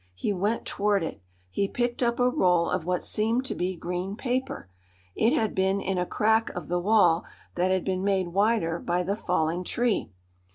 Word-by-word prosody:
He 205 - -1
went 205 +5 -1
toward 200 -2 +1
it. 160 - -5 0.3
He 200 - 0
picked 240 +3 -2
up 235 0 +1
a 245 - +4
roll 180 -8 +2
of 180 -3 -1
what 180 -1 0
seemed 225 +4 0
to - - -2
be 185 +1 -2
green 180 +3 -4
paper. 255 - -3 0.5
It 225 - +2
had 220 -2 +1
been 190 +1 +1
in 195 -2 -1
a 180 - -1
crack 220 +1 +2
of 175 -4 -6
the 175 0 +1
wall 180 -4 +4 0.3
that 180 +1 +1
had 185 -1 +1
been 185 -1 -1
made 190 -3 +1
wider 195 -3 +1
by 175 +1 -1
the 195 +3 -1
falling 175 -3 -1
tree. 235 +4 0
190 Hz, 195 wpm, -27 LUFS, 180-220 Hz, 0.5 s, a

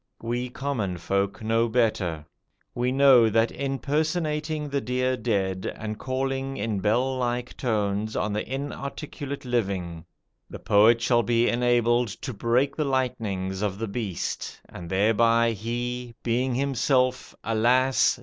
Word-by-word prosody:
We 120 +2 -2
common 120 -9 -3
folk 100 +4 -1
know 115 +1 +2
better. 100 -10 0 0.5
We 125 +1 0
know 130 -4 +6
that 115 +2 +2
in 135 0 -3
personating 155 +1 -1
the 140 0 -1
dear 130 0 0
dead, 100 -6 -1
and 110 -1 -5
calling 135 +1 -2
in 105 -1 -2
bell 125 +6 +1
like 120 0 -2
tones 105 -2 -1
on 105 - -1
the 105 - -1
inarticulate 140 0 -5
living, 95 -9 -2 0.4
the - - -7
poet 110 +3 +4
shall 120 0 +3
be 120 0 +2
enabled 120 0 +2 0.2
to 130 - -4
break 120 +6 +1
the 155 - 0
lightnings 105 -8 -2
of 100 -2 -1
the 115 +1 -3
Beast, 100 -4 -4
and 85 -1 -9
thereby 115 +4 +3
he, 120 +2 -4
being 125 +2 0
himself, 130 -1 +1
alas! 125 +5 +3
120 Hz, 135 wpm, -26 LUFS, 105-130 Hz, 0.5 s, know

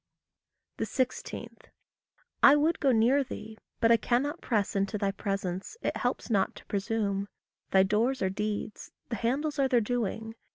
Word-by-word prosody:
16. 260 -2 -3 0.8
I 280 - +9
would 310 +3 +2
go 275 - +3
near 250 +5 +4
thee 220 -4 -8 0.2
but 230 -1 +4
I 230 - +7
cannot 270 +8 0
press 210 -5 0
Into 200 +2 0
thy 200 -1 0
presence 195 - -4
it - - -1
helps 245 0 -2
not 195 -3 +2
to - - -13
presume. 200 -1 -1 0.4
Thy 190 0 +5
doors 225 +5 +1
are 190 - +2
deeds; 210 +1 -4 0.2
the 235 - -2
handles 285 +7 -1
are 270 - +4
their 250 -2 +4
doing. 225 -1 -2
225 Hz, 155 wpm, -29 LUFS, 200-260 Hz, 0.8 s, I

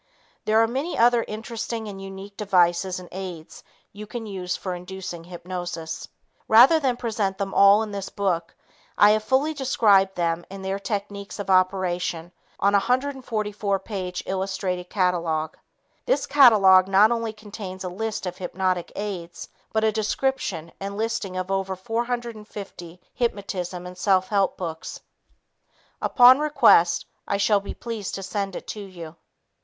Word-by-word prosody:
There 215 +1 +3
are 225 - +4
many 270 +9 -3
other 240 0 +4
interesting 225 +1 -5
and 195 -2 -8
unique 195 +1 -9
devices 185 -2 +2
and 180 - -11
aids 180 -4 -8 0.3
you 210 +1 -9
can 230 +1 -6
use 185 -3 -4
for 185 - -4
inducing 180 -1 -7
hypnosis. 175 -2 -6 0.4
Rather 250 +9 +7
than 260 -5 0
present 215 -5 -2
them 195 -1 -3
all 200 +2 +6
in 215 - -6
this 200 -1 -5
book, 180 -4 -2 0.4
I 205 - +7
have 215 0 +1
fully 270 +7 +1
described 205 -9 +3
them 170 -1 -1
and 195 0 -8
their 195 +1 -2
technique 200 0 -5
of 200 -2 -3
operation 185 -2 +1 0.3
in 200 - +6
a 200 - +5
144 220 -6 -1
page 185 -4 -5
illustrated 185 -1 -3
catalog. 170 -5 0 0.5
This - - +2
catalog 200 -9 +6
not 200 +3 +5
only 230 -1 -1
contains 205 -3 -8
a - - -3
list 215 +3 -4
of 180 0 -5
hypnotic 185 -1 -2
aids, 185 -5 -6 0.2
but 220 0 0
a 220 - +3
description 215 -6 -2
and 200 +1 -5
listing 215 -4 -2
of 185 +1 -3
over 195 0 -1
450 215 -5 -5
hypnotism 195 -6 -3
and 180 0 -8
self 185 0 +2
help 200 -2 +1
books. 165 -3 -6 1.0
Upon 255 +1 +7
request, 275 - +4 0.2
I 200 - 0
shall 205 +1 +3
be 200 - -8
pleased 225 -4 -5
to 195 - -6
send 195 -1 -3
it - - -7
to 215 - -5
you. 170 -5 -9
195 Hz, 150 wpm, -24 LUFS, 185-220 Hz, 1.0 s, Rather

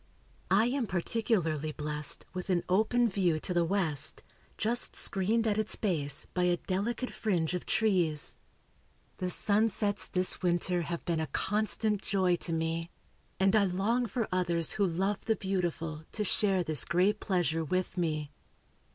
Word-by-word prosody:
I 205 +4 +4
am 250 -1 0
particularly 175 - 0
blessed 150 0 -1
with 185 +1 -5
an 175 -2 +2
open 220 +6 +3
view 185 -6 +1
to 180 - -1
the 175 -1 +3
west, 165 -5 -1 0.3
just 235 +3 0
screened 215 +4 +1
at 215 -1 +1
its 215 - 0
base 150 -8 -2
by 180 0 +1
a 175 0 +2
delicate 210 +8 -2
fringe 180 -7 0
of 180 - -4
trees. 180 -9 +1 0.8
The 185 - -1
sunsets 205 +1 +1
this 180 0 -1
winter 175 0 +1
have 170 +1 -4
been 170 -2 0
a 160 - -1
constant 210 +1 -1
joy 190 -3 +2
to 170 - -2
me, 165 +1 -1 0.5
and 190 +2 +4
I 210 -2 +5
long 210 +7 +1
for 225 +1 -2
others 175 -3 +1
who 200 -2 +2
love 190 +4 -1
the 220 - +2
beautiful 170 -5 -2
to 215 - -1
share 195 -2 +3
this 155 -4 +3
great 190 +5 +2
pleasure 165 -4 0
with 185 +3 -1
me. 155 -4 -1
185 Hz, 155 wpm, -30 LUFS, 165-210 Hz, 0.8 s, I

